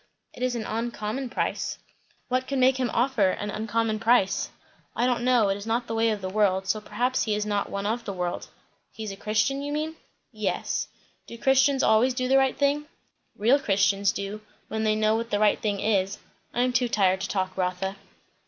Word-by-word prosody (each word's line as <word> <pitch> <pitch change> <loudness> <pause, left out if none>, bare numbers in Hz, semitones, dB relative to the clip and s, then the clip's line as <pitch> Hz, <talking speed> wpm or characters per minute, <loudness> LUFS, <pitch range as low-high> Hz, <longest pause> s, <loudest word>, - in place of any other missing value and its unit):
"It - - -12
is 255 -1 0
an 225 -2 -3
uncommon 235 +2 -3
price." - - -2 0.5
"What 255 0 0
could 275 - -2
make 260 0 +4
him 255 -2 0
offer 235 -6 +2
an 205 +2 -3
uncommon 220 0 -1
price?" 225 -4 +2 0.5
"I 240 - +1
don't 245 -1 +1
know. 245 -5 +4
It 195 - 0
is 205 +2 -9
not 230 +2 0
the 225 - -5
way 225 0 +2
of 210 -2 -2
the 185 - -3
world, 190 -2 +2
so 210 +2 0
perhaps 245 +5 0
he 215 -2 0
is 210 0 -1
not 205 -1 -1
one 200 0 -4
of 230 +3 -1
the - - -3
world." 180 -1 -3 0.4
"He's 215 -2 -6
a - - -6
Christian, 220 +7 0
you 290 +1 -4
mean?" 310 +2 -3 0.3
"Yes." - - -2 0.4
"Do 235 - -9
Christians 265 +1 +3
always 245 +4 +4
do 255 0 -1
the 270 +1 +4
right 265 -1 +1
thing?" 290 +1 +1 0.5
"Real 240 +7 +4
Christians 200 -3 +2
do, 200 +2 -5 0.3
when 220 0 -2
they 215 0 +3
know 215 0 +2
what 230 +1 -2
the 205 - +1
right 210 0 +3
thing 205 -2 -1
is. 195 -2 +1 0.3
I 240 - 0
am 250 0 0
too 245 -1 +2
tired 190 -3 +2
to 200 - -2
talk, 185 -1 -2
Rotha." 185 +1 -2
220 Hz, 210 wpm, -26 LUFS, 200-250 Hz, 0.5 s, make